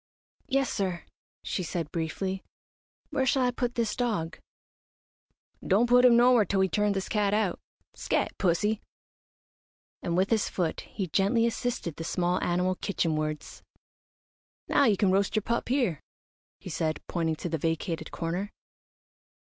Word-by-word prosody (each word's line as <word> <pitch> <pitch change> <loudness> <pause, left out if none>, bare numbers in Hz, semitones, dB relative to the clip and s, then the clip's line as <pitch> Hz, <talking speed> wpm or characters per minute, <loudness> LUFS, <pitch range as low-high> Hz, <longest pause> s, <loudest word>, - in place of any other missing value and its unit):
"Yes 275 -1 +1
sir," 185 -4 -2 0.4
she - - -2
said, 165 -2 -3
briefly. 185 +4 -2 0.7
"Where 265 - +1
shall 265 0 +3
I 250 - +2
put 245 0 -2
this 230 -3 0
dog?" 210 -10 -2 1.2
"Don't 205 +5 +3
put 245 +1 +5
him 240 -2 +7
nowhere 240 -2 +6
till 195 0 0
we 190 - +2
turn 210 +3 +1
this 195 -1 -3
cat 205 -1 +1
out. 210 -5 0 0.3
Scat, - - -1
pussy!" 205 +4 +1 1.2
and 170 0 -1
with 190 +4 +2
his 220 -2 +2
foot 170 -4 -2
he 195 - -3
gently 200 +7 +2
assisted 235 - -2
the 165 - -4
small 175 +2 0
animal 180 +1 +1
kitchenwards. 155 -5 -2 1.1
"Now 280 - +4
you 210 -5 +3
can 195 -2 +3
roast 195 +3 +1
your 215 - +1
pup 235 +2 -1
here," 240 - +1 0.6
he - - -8
said, 155 -1 -1
pointing 165 -2 -1
to 175 - -5
the 160 -1 -2
vacated 165 +1 -2
corner. 175 +4 -3
195 Hz, 150 wpm, -28 LUFS, 170-230 Hz, 1.2 s, him